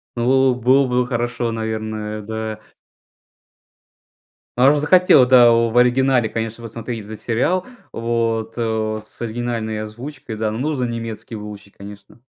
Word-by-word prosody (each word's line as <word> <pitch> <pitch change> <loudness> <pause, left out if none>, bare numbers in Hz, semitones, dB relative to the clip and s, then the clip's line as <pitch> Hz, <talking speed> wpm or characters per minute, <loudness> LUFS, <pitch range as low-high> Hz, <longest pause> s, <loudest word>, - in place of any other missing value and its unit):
Ну, 120 - -3
было 130 0 +4
было 130 +3 +3 0.2
бы - - -7
хорошо, 120 -1 -2
наверное, 110 -1 -4
да. 110 0 -5 2.0
А 130 +2 +6
уж 150 - +3
захотел, 150 -2 +5
да, 125 -2 +7
в 115 0 +2
оригинале 125 -1 +3
конечно 115 +1 -5
посмотреть 115 -1 -6
этот 110 +1 -8
сериал 150 +11 0 0.3
вот, 115 -1 -2
о, 110 -2 -1
с - - -16
оригинальной 115 -2 -3
озвучкой, 120 +2 -8
да. 110 0 -1
Но 110 - -4
нужно 145 -1 -1
немецкий 115 -1 -6
выучить, 105 -2 -10
конечно. 100 +2 -12
115 Hz, 135 wpm, -20 LUFS, 110-125 Hz, 2.0 s, да